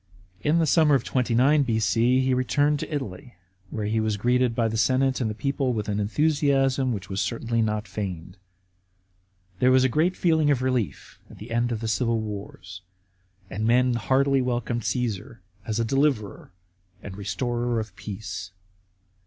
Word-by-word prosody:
In 150 +3 +2
the 165 - +3
summer 155 -2 +4
of 130 - 0
29 130 +4 +2
B.C. 115 +1 +2
he 130 0 +1
returned 145 +3 +1
to - - -6
Italy, 125 -6 -5 0.3
where 105 +1 -4
he 110 +2 0
was 110 -1 0
greeted 125 +2 +1
by 115 -2 +1
the 110 - -3
senate 130 +3 +2
and 115 - 0
the 110 - -4
people 140 +1 -1
with 105 -3 -3
an 105 0 -1
enthusiasm 135 +2 +1
which 100 -4 -5
was 95 0 -2
certainly 115 -1 -1
not 105 -1 -1
feigned. 90 -3 -6 1.2
There 125 - +4
was 130 0 +5
a 130 - +3
general 155 +8 +2
feeling 160 -4 +2
of 130 -3 +1
relief 125 - -2
at - - -13
the 110 +3 -10
end 120 +1 0
of 115 -1 -3
the 115 - -3
civil 115 +1 0
wars, 100 -3 -7 0.7
and 105 +4 -3
men 125 +1 +3
heartily 135 +5 +2
welcomed 120 -1 -2
Cassar 115 -4 -4 0.2
as 110 0 -1
a 115 - +1
deliverer 130 -8 0 0.5
and 95 - -8
restorer 120 +4 -2
of 110 -4 -6
peace. 100 -1 -7
120 Hz, 170 wpm, -25 LUFS, 105-130 Hz, 1.2 s, was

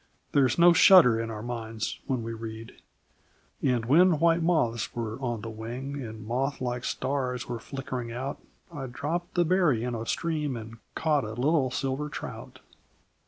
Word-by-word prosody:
There 140 -2 +4
is 120 - -2
no 175 0 +7
shudder 170 - +7
in 115 0 -3
our 110 -1 -6
minds 115 -2 -4
when 130 -4 -1
we 115 0 -4
read: 115 0 -8 0.8
And 125 -3 +1
when 165 +6 +5
white 165 +1 +3
moths 155 -10 0
were 115 +1 -4
on 120 -4 -2
the 115 - -6
wing, 125 +6 -6
And 110 -2 -8
moth 135 +5 -1
like 125 -1 -3
stars 130 -2 -2
were 120 -1 -4
flickering 125 -1 -5
out, 130 +4 -5 0.3
I 135 -4 -5
dropped 155 +8 -4
the 175 -1 +3
berry 165 -9 +2
in 125 0 -2
a 115 0 -4
stream, 150 -6 -1
And 115 0 -9 0.2
caught 150 -3 +1
a 110 - -5
little 135 +2 +2
silver 135 +3 -2
trout. - - -8
125 Hz, 170 wpm, -28 LUFS, 115-150 Hz, 0.8 s, no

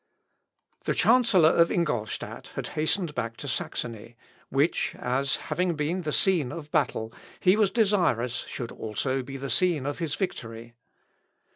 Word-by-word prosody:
] - - -39
The - - 0
chancellor 225 -9 +5
of 170 0 +4
Ingolstadt 120 -11 -2
had - - -4
hastened 160 +1 0
back 115 -4 -3
to 145 - -7
Saxony, 115 -2 -4 0.3
which, 140 +5 +1
as 135 +2 0
having 180 -1 -1
been 155 +5 -1
the 155 -3 -3
scene 170 - +2
of 155 -3 -8
battle, 110 +1 0 0.3
he 185 +2 +5
was 210 -2 +3
desirous 180 - +2
should 120 -2 -5
also 130 +5 -2
be 135 +2 -7
the 135 0 -4
scene 175 -7 +2
of 145 +3 -3
his 160 -4 -1
victory. 115 - -5
150 Hz, 150 wpm, -27 LUFS, 120-180 Hz, 0.3 s, chancellor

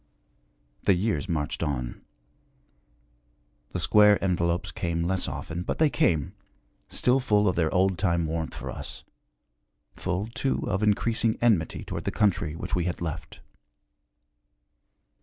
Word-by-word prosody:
The 100 - +4
years 100 +1 -1
marched 75 -3 -2
on. 65 -6 -3 1.7
The - - -4
square 105 -1 +6
envelopes 85 -2 0
came 85 -1 -2
less 95 +2 0
often, 85 +2 -4
but - - -3
they 155 -2 +3
came, 80 -5 +1 0.6
still 125 +2 +2
full 105 -5 +2
of 90 - +2
their 80 -2 +1
old 95 0 +2
time 85 -4 +1
warmth 80 -4 -3
for 65 0 -6
us - - -7 0.9
full, 90 +4 -2
too, 115 +4 -2
of 95 - 0
increasing 110 +1 +2
enmity 105 -10 +2
toward - - -5
the - - 0
country 85 -7 +1
which - - -6
we 90 -2 +1
had 90 - -2
left. 80 -3 -6
90 Hz, 135 wpm, -27 LUFS, 80-105 Hz, 1.7 s, square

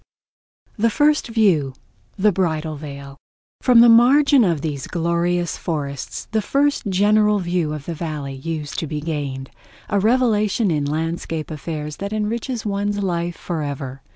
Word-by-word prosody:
The 230 +2 +3
First 295 +6 +2
View: 185 - +2 0.4
The 210 +2 +4
Bridal 160 -4 -1
Veil 140 -2 -9 0.4
From 245 -2 +6
the 240 - +8
margin 260 +4 +6
of 170 -7 +1
these 145 -3 -4
glorious 170 0 0
forests 140 -5 -4
the 220 -1 +1
first 280 +2 0
general 210 +2 +3
view 175 -4 -1
of 150 -2 -6
the 170 - -4
Valley 150 -4 -5
used 150 +2 -4
to 160 - -3
be 150 0 -3
gained—a 145 +4 -5
revelation 215 -2 +2
in 150 -2 0
landscape 160 +1 -3
affairs 150 0 -5
that 200 +1 -5
enriches 225 +3 -2
one's 205 0 -1
life 175 -2 -2
forever. 140 -5 -5
170 Hz, 140 wpm, -21 LUFS, 150-210 Hz, 0.4 s, the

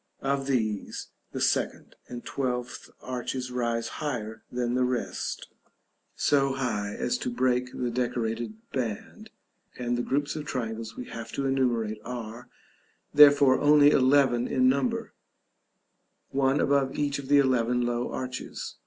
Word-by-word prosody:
Of 135 0 0
these, 110 -6 -2 0.2
the - - -4
second - - 0
and 120 -1 -8
twelfth 125 -2 -3
arches 125 0 -4
rise 120 -2 -1
higher 115 -7 -4
than 120 -1 -1
the 125 0 +2
rest; 125 -1 -2 0.7
so 135 -2 +2
high 105 -6 -2
as 245 - -1
to 250 - -2
break 125 - 0
the 125 -1 -3
decorated 120 - -2 0.2
band; 115 -6 -4 0.5
and 120 -1 -1
the 120 - 0
groups 145 +4 -1
of 155 - -4
triangles 115 -4 -4
we 125 - -5
have 115 -1 -7
to 140 - -2
enumerate 120 -5 0
are, 115 -1 -7 0.6
therefore, 145 -2 +7
only 145 0 +6
eleven 130 -3 +4
in 130 0 +3
number; 130 -1 0 1.2
one 135 +1 +2
above 140 -1 +2
each 145 -1 0
of 135 - -8
the 145 +1 +5
eleven 125 -3 +2
low 120 0 -1
arches. 130 -1 -5
125 Hz, 135 wpm, -27 LUFS, 120-135 Hz, 1.2 s, therefore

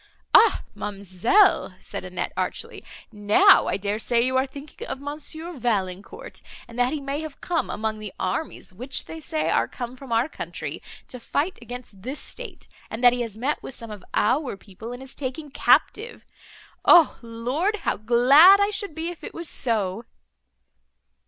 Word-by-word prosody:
"Ah 455 - +6
ma'amselle!" 205 - +2
said - - -6
Annette - - -4
archly, - - -4 0.3
"now 205 -1 +5
I - - 0
dare 205 +2 -2
say 235 +1 +1
you 260 0 0
are 260 +1 +2
thinking 280 +3 -10
of 265 - -5
Monsieur 310 +4 -6
Valancourt, 200 -6 -3 0.3
and 235 +1 -9
that 245 +1 +3
he 305 - -2
may 280 +1 -3
have 310 -3 -8
come 340 -2 -1
among 215 0 -3
the 210 -2 -7
armies, 185 +2 -3
which, 255 +8 -5
they 325 - -8
say, 315 0 -1
are - - +2
come 245 0 -7
from 260 -1 -12
our 230 +4 +2
country, - - -6 0.3
to 250 - -9
fight 295 +9 -2
against 240 -4 -10
this 265 +8 -5
state, - - -8 0.2
and 225 +3 -6
that 245 0 +8
he 245 - -2
has 225 -3 -5
met 270 +6 -1
with 270 - -7
some 230 -1 -7
of 205 -2 -9
our 255 0 +1
people, 215 +4 -10
and 245 +2 -8
is 265 - -9
taken 285 +2 -6
captive. 440 - +2 0.6
O 335 -4 +6
Lord! 250 - -2
how - - +1
glad 265 - +7
I 405 +1 +2
should 400 -5 -4
be, 325 +1 -3
if 350 - -10
it - - -8
was 340 -1 -5
so!" 220 -4 -1
255 Hz, 175 wpm, -24 LUFS, 220-310 Hz, 0.6 s, that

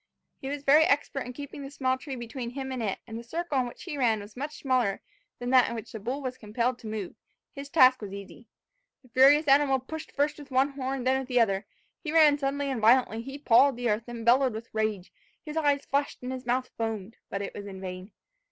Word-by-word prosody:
He 265 - -7
was 285 0 -4
very 300 +3 +6
expert 280 -3 0
in 250 - -7
keeping 285 +1 -8
the 275 - -7
small 260 -2 0
tree 265 +1 -7
between 240 0 -6
him 265 +1 -5
and 255 -2 -3
it; 205 -4 -1
and 225 0 -7
as - - -9
the 235 - -24
circle 330 -3 -1
in 250 - 0
which 240 - -10
he 290 - -5
ran 225 -4 +3
was 205 +1 -11
much 290 +4 -5
smaller 250 -7 +1 0.4
than 245 +1 -4
that 255 -2 +6
in 235 - -4
which 225 - -7
the 220 - -6
bull 255 +7 -4
was 255 -1 -4
compelled 235 +4 -1
to 225 - -9
move, 215 -4 -4 0.4
his 280 -1 -8
task 255 -4 +6
was 205 -2 -6
easy. 200 +4 -10 0.6
The 255 - -21
furious 275 +5 +6
animal 275 -1 +5
pushed 305 +5 -8
first 295 +1 0
with 285 -1 -11
one 265 +1 +3
horn 270 -2 -4
then 260 +1 +2
with 265 - -6
the 250 -1 +2
other; 195 -3 +1 0.4
he 305 - -3
ran 305 -3 +6
suddenly 280 0 -1
and 245 -4 -3
violently; 230 0 +4
he 270 +4 -7
pawed 275 0 +5
the 245 -2 0
earth, 215 +2 -1
and 235 -1 -7
bellowed 255 +1 +4
with 225 +1 -8
rage; 215 -4 -2 0.3
his 300 0 -6
eyes 290 -3 +1
flashed 280 -2 -1
and 250 - -4
his 255 -1 -6
mouth 250 +1 0
foamed, 225 -1 -4
but 200 0 -3
it 195 - -6
was 205 0 -7
in 190 -1 -8
vain. 185 +1 -7
255 Hz, 245 wpm, -28 LUFS, 225-280 Hz, 0.6 s, very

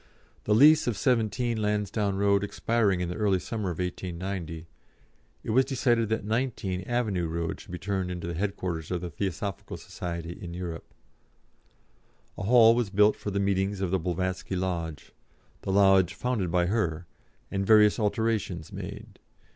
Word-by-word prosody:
The 105 - +3
lease 150 +5 +6
of 115 -5 0
17, 115 0 +1
Lansdowne 105 -1 0
Road 100 0 +3
expiring 100 -2 +1
in 90 - -2
the 90 - -4
early 105 -3 +2
summer 105 +1 -3
of 85 - -4
1890, 90 -2 -4 0.8
it - - -7
was 130 +4 +5
decided 120 -4 +1
that 110 -2 -1
19, 110 -5 -1
Avenue 105 -8 0
Road 85 0 -3
should - - -14
be 90 - -4
turned 95 0 -2
into 90 -2 -5
the 85 - -3
headquarters 90 -3 -3
of 90 -2 -2
the 90 -1 -5
Theosophical 95 +3 -4
Society 85 -1 -6
in 85 -3 -7
Europe. 85 -2 -6 1.4
A - - -7
hall 115 0 +7
was 120 -3 0
built 105 +2 +4
for - - -5
the 100 0 -1
meetings 100 0 0
of 95 -2 -1
the 95 - +2
Blavatsky 95 +2 -2
Lodge 85 -5 -3 0.5
the 95 - -3
lodge 95 -2 +4
founded 120 -8 -1
by 90 0 +2
her 90 -5 -1 0.5
and 100 0 -1
various 105 +1 +5
alterations 105 -6 -1
made. - - -8
95 Hz, 160 wpm, -27 LUFS, 90-110 Hz, 1.4 s, hall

